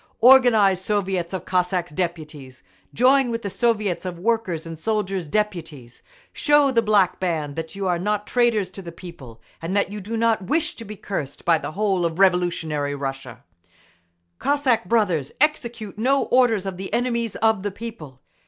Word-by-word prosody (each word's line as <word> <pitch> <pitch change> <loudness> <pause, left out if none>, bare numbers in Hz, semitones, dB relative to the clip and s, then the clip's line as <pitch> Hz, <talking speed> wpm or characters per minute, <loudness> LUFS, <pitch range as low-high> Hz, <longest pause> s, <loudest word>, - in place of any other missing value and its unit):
Organise 225 -7 +6
Soviets 190 -4 -1
of 190 -3 -5
Cossacks' 180 -1 0
Deputies! 150 - -5 0.3
Join 260 +2 +3
with 230 0 -3
the 200 - -4
Soviets 215 -6 0
of 180 -2 -5
Workers' 190 -5 -1
and 165 -1 -8
Soldiers' 195 -3 -2
Deputies! 165 - -4 0.3
Show 295 -2 +3
the 235 -3 +3
Black 205 -4 +2
Band 155 -6 -2
that 160 +2 -6
you 195 0 -4
are 175 -2 0
not 210 +2 -1
traitors 225 -6 +1
to 195 - -8
the 170 -2 -8
People, 160 -10 -12 0.2
and 170 +4 -3
that 200 -1 0
you 210 0 -6
do 225 +4 -4
not 225 -1 +2
wish 315 - 0
to 230 - -8
be 215 +1 -8
cursed 150 -9 -6
by 165 -2 +4
the 155 - -6
whole 195 -2 0
of 165 -1 -1
revolutionary 170 -6 +1
Russia!… 135 -3 -6 1.0
Cossack 280 -8 +1
brothers, 180 - 0
execute 235 -8 -1
no 270 +4 +2
orders 240 -6 +2
of 190 -2 -4
the 190 +1 -7
enemies 235 -3 -1
of 220 -3 +2
the 205 - -2
people. 195 - -10
195 Hz, 170 wpm, -23 LUFS, 170-225 Hz, 1.0 s, Organise